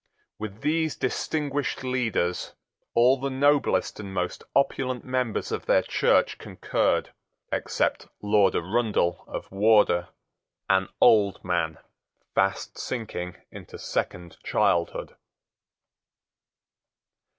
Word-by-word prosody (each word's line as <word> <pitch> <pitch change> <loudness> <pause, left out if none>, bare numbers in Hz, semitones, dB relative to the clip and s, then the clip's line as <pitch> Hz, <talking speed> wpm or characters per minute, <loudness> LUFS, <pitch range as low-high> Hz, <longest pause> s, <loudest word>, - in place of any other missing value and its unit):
With 110 0 -7
these 160 0 0
distinguished 145 +1 -2
leaders 120 -9 -1 0.4
all 125 +3 +5
the 140 +1 -2
noblest 140 -1 +2
and 100 -2 -6
most 90 -1 -3
opulent 130 -2 +1
members 125 -3 -1
of - - -4
their - - +4
church - - +2
concurred, - - -1 0.4
except - - -1
Lord 105 -2 +3
Arundell 95 -2 0
of - - -7
Wardour, 100 -4 +4 0.6
an 95 0 +3
old 105 -4 +4
man 85 -3 0 0.6
fast 95 0 0
sinking 95 -8 -4 0.2
into - - -10
second 85 -1 -4
childhood. 85 -1 0
110 Hz, 95 wpm, -26 LUFS, 95-130 Hz, 0.6 s, all